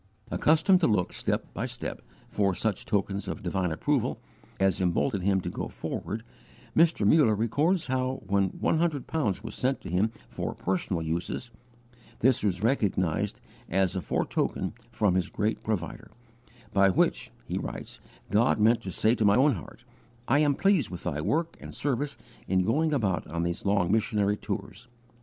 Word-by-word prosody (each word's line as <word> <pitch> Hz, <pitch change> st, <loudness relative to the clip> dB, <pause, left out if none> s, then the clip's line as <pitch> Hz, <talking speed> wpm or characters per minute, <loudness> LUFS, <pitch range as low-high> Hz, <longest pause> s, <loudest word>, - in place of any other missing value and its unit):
Accustomed 160 Hz, +5 st, +4 dB
to 175 Hz, -, +3 dB
look, 100 Hz, -5 st, +1 dB
step -, -, -2 dB
by -, -, -2 dB
step, -, -, -5 dB, 0.3 s
for 100 Hz, -3 st, +1 dB
such 110 Hz, -1 st, -1 dB
tokens 100 Hz, -1 st, -1 dB
of -, -, -5 dB
divine 90 Hz, -1 st, -1 dB
approval, 130 Hz, -, 0 dB, 0.4 s
as 95 Hz, 0 st, +2 dB
emboldened 95 Hz, +3 st, +1 dB
him 95 Hz, 0 st, +2 dB
to -, -, -4 dB
go -, -, -4 dB
forward, 110 Hz, +1 st, -5 dB, 0.5 s
Mr. 160 Hz, -9 st, +4 dB
Muller 115 Hz, -1 st, +5 dB
records 145 Hz, -, +1 dB
how, 130 Hz, 0 st, -1 dB
when 100 Hz, -1 st, +2 dB
one 160 Hz, -, 0 dB
hundred 160 Hz, -5 st, 0 dB
pounds 110 Hz, -, -1 dB
was 115 Hz, -, -6 dB
sent 130 Hz, +1 st, 0 dB
to -, -, -7 dB
him 100 Hz, +5 st, +2 dB, 0.2 s
for -, -, -4 dB
personal 90 Hz, -2 st, -1 dB
uses, 85 Hz, +9 st, -3 dB, 0.7 s
this 130 Hz, +1 st, +3 dB
was 95 Hz, -2 st, 0 dB
recognized 100 Hz, -, +1 dB, 0.3 s
as 95 Hz, 0 st, +1 dB
a 95 Hz, -, -1 dB
foretoken -, -, -1 dB, 0.2 s
from 105 Hz, -4 st, +2 dB
his 90 Hz, -1 st, 0 dB
great 110 Hz, +2 st, -1 dB
Provider, 100 Hz, -7 st, -3 dB, 0.6 s
"by 100 Hz, -1 st, +5 dB
which," 90 Hz, -, +1 dB, 0.2 s
he -, -, -2 dB
writes, -, -, -6 dB, 0.3 s
"God 110 Hz, +3 st, +3 dB
meant 115 Hz, +2 st, +4 dB
to 95 Hz, -, -6 dB
say 110 Hz, +5 st, +2 dB
to 115 Hz, -, 0 dB
my 100 Hz, -1 st, +5 dB
own 140 Hz, +4 st, +5 dB
heart, 105 Hz, +4 st, -9 dB, 0.4 s
'I 135 Hz, +4 st, +4 dB
am 145 Hz, -2 st, +3 dB
pleased 195 Hz, -, +3 dB
with 90 Hz, -2 st, -7 dB
thy 75 Hz, +1 st, -2 dB
work 165 Hz, -, -1 dB
and -, -, -9 dB
service 140 Hz, +1 st, -1 dB, 0.3 s
in 95 Hz, 0 st, +2 dB
going 155 Hz, +9 st, +2 dB
about 105 Hz, -11 st, 0 dB
on 85 Hz, +1 st, -2 dB
these 85 Hz, +3 st, -3 dB
long 100 Hz, -3 st, +2 dB
missionary 105 Hz, -2 st, +2 dB
tours. 105 Hz, +3 st, -6 dB
105 Hz, 170 wpm, -28 LUFS, 95-130 Hz, 0.7 s, Muller